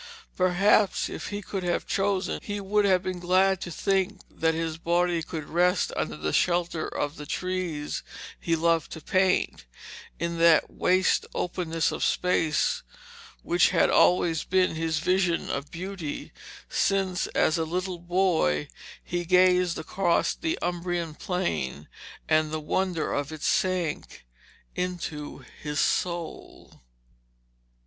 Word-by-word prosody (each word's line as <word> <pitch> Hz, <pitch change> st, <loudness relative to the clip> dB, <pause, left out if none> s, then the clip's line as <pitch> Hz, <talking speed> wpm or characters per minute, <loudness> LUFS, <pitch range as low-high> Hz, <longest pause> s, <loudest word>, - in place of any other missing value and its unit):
Perhaps 190 Hz, +2 st, +3 dB
if -, -, -6 dB
he 205 Hz, 0 st, -5 dB
could 195 Hz, +1 st, -4 dB
have 175 Hz, -1 st, -1 dB
chosen, 195 Hz, -1 st, 0 dB
he 205 Hz, -1 st, -4 dB
would 205 Hz, +1 st, +1 dB
have 185 Hz, -2 st, +3 dB
been 185 Hz, -1 st, -3 dB
glad 185 Hz, +2 st, +3 dB
to -, -, -5 dB
think 195 Hz, +2 st, 0 dB
that 160 Hz, 0 st, 0 dB
his 165 Hz, -1 st, -3 dB
body 175 Hz, 0 st, +1 dB
should 160 Hz, -1 st, -5 dB
rest 180 Hz, +3 st, +2 dB
under -, -, -2 dB
the -, -, -2 dB
shelter 175 Hz, -2 st, +1 dB
of 145 Hz, +2 st, -3 dB
the 150 Hz, -, -8 dB
trees 180 Hz, -5 st, -3 dB, 0.4 s
he 165 Hz, -, 0 dB
loved 165 Hz, 0 st, +1 dB
to 160 Hz, -, -7 dB
paint, 185 Hz, -, +1 dB, 0.5 s
in 170 Hz, 0 st, -3 dB
that 165 Hz, -1 st, +5 dB
waste 185 Hz, +1 st, +2 dB
openness 170 Hz, -2 st, -1 dB
of -, -, -3 dB
space 180 Hz, -, +1 dB, 0.6 s
which 345 Hz, +1 st, +3 dB
had -, -, +3 dB
always 170 Hz, -3 st, +3 dB
been 185 Hz, -1 st, +2 dB
his 160 Hz, -1 st, -1 dB
vision 180 Hz, +1 st, +1 dB
of 140 Hz, +1 st, -4 dB
beauty, 180 Hz, -3 st, -6 dB, 0.4 s
since, 190 Hz, -2 st, 0 dB
as 160 Hz, +2 st, +3 dB
a -, -, +1 dB
little 180 Hz, +2 st, -3 dB
boy, 175 Hz, -, +1 dB, 0.4 s
he 175 Hz, 0 st, -3 dB
gazed 180 Hz, 0 st, +4 dB
across 170 Hz, +2 st, +1 dB
the 325 Hz, +1 st, -2 dB
Umbrian 175 Hz, -2 st, -2 dB
Plain, 160 Hz, -, -3 dB, 0.4 s
and 155 Hz, 0 st, +3 dB
the 155 Hz, 0 st, -3 dB
wonder 175 Hz, +1 st, -1 dB
of 145 Hz, +1 st, -2 dB
it 155 Hz, -1 st, -8 dB
sank 180 Hz, -, -1 dB, 0.5 s
into 160 Hz, -7 st, -4 dB, 0.2 s
his 150 Hz, -1 st, -3 dB
soul. 170 Hz, -2 st, -2 dB
175 Hz, 135 wpm, -27 LUFS, 160-185 Hz, 0.6 s, that